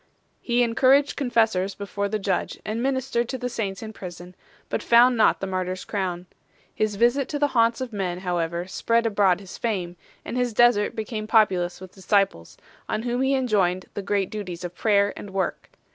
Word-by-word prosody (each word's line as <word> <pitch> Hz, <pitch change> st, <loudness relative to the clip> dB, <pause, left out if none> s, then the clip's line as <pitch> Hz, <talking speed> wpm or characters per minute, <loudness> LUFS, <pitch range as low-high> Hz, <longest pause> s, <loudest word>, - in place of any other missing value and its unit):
He 245 Hz, 0 st, +2 dB
encouraged 265 Hz, +5 st, +3 dB
confessors 220 Hz, -7 st, +1 dB
before 200 Hz, 0 st, -3 dB
the 215 Hz, -, -1 dB
judge 195 Hz, -3 st, -2 dB
and 215 Hz, +2 st, -2 dB
ministered 260 Hz, -2 st, -1 dB
to 260 Hz, -, -3 dB
the 250 Hz, 0 st, -3 dB
saints 200 Hz, -4 st, -4 dB
in 220 Hz, 0 st, -7 dB
prison, 180 Hz, -2 st, -9 dB, 0.3 s
but -, -, -2 dB
found 245 Hz, +2 st, +5 dB
not 220 Hz, -, +3 dB
the -, -, -3 dB
martyr 185 Hz, -1 st, -2 dB
s 185 Hz, -, -8 dB
crown. 185 Hz, -3 st, -3 dB, 0.5 s
His 215 Hz, -1 st, -1 dB
visit 240 Hz, +5 st, +2 dB
to 295 Hz, -, -2 dB
the 290 Hz, 0 st, +1 dB
haunts 230 Hz, 0 st, +2 dB
of 250 Hz, -3 st, -5 dB
men 185 Hz, -3 st, -3 dB
however 175 Hz, -1 st, -2 dB
spread 230 Hz, +5 st, 0 dB
abroad 200 Hz, -5 st, +3 dB
his 195 Hz, -2 st, -11 dB
fame, 185 Hz, -7 st, -2 dB, 0.3 s
and -, -, -5 dB
his 245 Hz, -3 st, -1 dB
desert 240 Hz, -3 st, +4 dB
became 215 Hz, -1 st, -4 dB
populous 190 Hz, -6 st, +2 dB
with 185 Hz, -1 st, -11 dB
disciples, 190 Hz, -, 0 dB, 0.3 s
on 215 Hz, +1 st, -1 dB
whom 245 Hz, +1 st, -1 dB
he 270 Hz, +1 st, +2 dB
enjoined 195 Hz, -8 st, +1 dB
the -, -, -4 dB
great 195 Hz, -1 st, -1 dB
duties 185 Hz, -5 st, -6 dB
of 175 Hz, 0 st, -5 dB
prayer 200 Hz, +1 st, +2 dB
and 205 Hz, -, -8 dB
work. 190 Hz, 0 st, -3 dB
210 Hz, 190 wpm, -24 LUFS, 185-235 Hz, 0.5 s, found